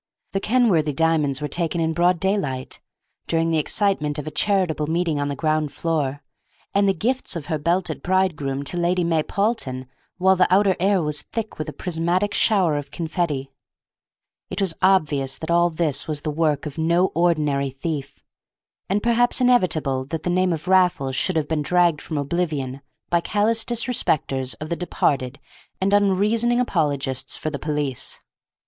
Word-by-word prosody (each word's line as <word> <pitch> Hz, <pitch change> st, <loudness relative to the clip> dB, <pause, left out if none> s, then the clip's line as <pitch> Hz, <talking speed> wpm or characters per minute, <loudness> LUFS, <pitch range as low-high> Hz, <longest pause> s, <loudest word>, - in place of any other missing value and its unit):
The 195 Hz, -, -1 dB
Kenworthy 195 Hz, -, +2 dB
diamonds 150 Hz, -3 st, +1 dB
were -, -, 0 dB
taken 170 Hz, +2 st, -2 dB
in 160 Hz, 0 st, 0 dB
broad 175 Hz, +1 st, +2 dB
daylight, 185 Hz, -10 st, -2 dB, 0.5 s
during 165 Hz, 0 st, +1 dB
the 160 Hz, -, +2 dB
excitement 150 Hz, -3 st, 0 dB
of 150 Hz, -, -4 dB
a 155 Hz, -, -5 dB
charitable 180 Hz, -7 st, 0 dB
meeting 165 Hz, -2 st, 0 dB
on 145 Hz, -, -1 dB
the 140 Hz, -, -3 dB
ground 155 Hz, 0 st, 0 dB
floor, 145 Hz, -4 st, -2 dB, 0.5 s
and 200 Hz, 0 st, +3 dB
the -, -, +3 dB
gifts 245 Hz, +5 st, -1 dB
of 165 Hz, -4 st, -5 dB
her 155 Hz, -2 st, -2 dB
belted 175 Hz, +5 st, -1 dB
bridegroom 160 Hz, -7 st, 0 dB
to 175 Hz, -, -2 dB
Lady 175 Hz, +1 st, +1 dB
May 165 Hz, -2 st, +1 dB
Paulton 175 Hz, -, -2 dB, 0.3 s
while 190 Hz, +1 st, +4 dB
the 180 Hz, -1 st, +2 dB
outer 195 Hz, 0 st, +4 dB
air 190 Hz, -1 st, +2 dB
was 150 Hz, 0 st, -2 dB
thick 225 Hz, -6 st, -6 dB
with 155 Hz, -, -3 dB
a -, -, -5 dB
prismatic 180 Hz, +3 st, -1 dB
shower 185 Hz, -9 st, +2 dB
of 145 Hz, -1 st, -5 dB
confetti. 155 Hz, -4 st, -3 dB, 1.0 s
It 185 Hz, -, -5 dB
was 190 Hz, -4 st, +2 dB
obvious 150 Hz, -8 st, +2 dB
that 160 Hz, +1 st, -5 dB
all 170 Hz, +1 st, +4 dB
this 160 Hz, -4 st, -1 dB
was 150 Hz, -2 st, -2 dB
the 155 Hz, -, -2 dB
work 150 Hz, -2 st, 0 dB
of 150 Hz, +1 st, -6 dB
no 170 Hz, +3 st, +2 dB
ordinary 150 Hz, -5 st, +1 dB
thief, 140 Hz, 0 st, -5 dB, 0.7 s
and 205 Hz, +2 st, 0 dB
perhaps 240 Hz, +2 st, +3 dB
inevitable 160 Hz, -, +2 dB
that 160 Hz, +3 st, -5 dB
the 175 Hz, -, 0 dB
name 185 Hz, 0 st, +2 dB
of 160 Hz, +1 st, -4 dB
Raffles 180 Hz, -8 st, +2 dB
should 185 Hz, +7 st, +1 dB
have 155 Hz, -2 st, 0 dB
been 160 Hz, -1 st, -1 dB
dragged 175 Hz, 0 st, +2 dB
from 155 Hz, -, -5 dB
oblivion 140 Hz, -3 st, -2 dB, 0.3 s
by 170 Hz, -1 st, +3 dB
callous 220 Hz, +5 st, +1 dB
disrespecters 155 Hz, -, 0 dB
of 155 Hz, -, -6 dB
the 170 Hz, -, 0 dB
departed 140 Hz, -6 st, -1 dB, 0.4 s
and 195 Hz, +1 st, +1 dB
unreasoning 210 Hz, +4 st, +2 dB
apologists 145 Hz, -, -1 dB
for 155 Hz, -, -3 dB
the 140 Hz, -, -4 dB
police. 150 Hz, -4 st, -2 dB
165 Hz, 170 wpm, -22 LUFS, 145-190 Hz, 1.0 s, while